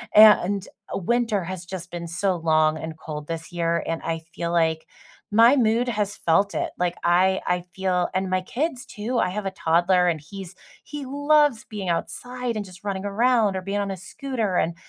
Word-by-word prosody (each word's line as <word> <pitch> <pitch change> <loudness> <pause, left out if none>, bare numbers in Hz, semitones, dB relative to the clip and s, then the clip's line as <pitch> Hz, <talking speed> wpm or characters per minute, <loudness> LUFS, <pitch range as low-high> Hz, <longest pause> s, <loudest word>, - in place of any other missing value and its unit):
And 205 -2 +6 0.2
winter 225 0 0
has 185 0 -6
just 185 0 -7
been 170 -1 -5
so 185 +3 0
long 155 -1 +2
and 160 0 -6
cold 150 -2 -7
this 165 0 -5
year, 170 -1 0
and 165 - -2
I 165 -1 -2
feel 170 0 -3
like 160 -2 +1 0.4
my 230 +5 +6
mood 235 -1 +2
has 210 -3 -1
felt 185 +5 +2
it. - - -1
Like, 175 -1 0
I 185 +2 +3
I 180 0 +1
feel 185 -2 0
and 190 0 -1
my 185 0 +1
kids, 255 - -3
too. 235 +3 -4
I 180 - +2
have 205 +2 -4
a - - -2
toddler, 180 +1 +2
and 165 -3 0
he's 190 +3 -9 0.3
he 295 -2 -7
loves 285 -2 +3
being 200 -4 -5
outside 245 +7 -3
and 215 - -2
just 185 0 -14
running 195 -2 -3
around 220 0 +2
or 190 - -2
being 200 +2 -2
on 200 -1 -2
a 195 - -4
scooter. 215 0 -3
And 165 +1 0
190 Hz, 195 wpm, -24 LUFS, 170-220 Hz, 0.4 s, And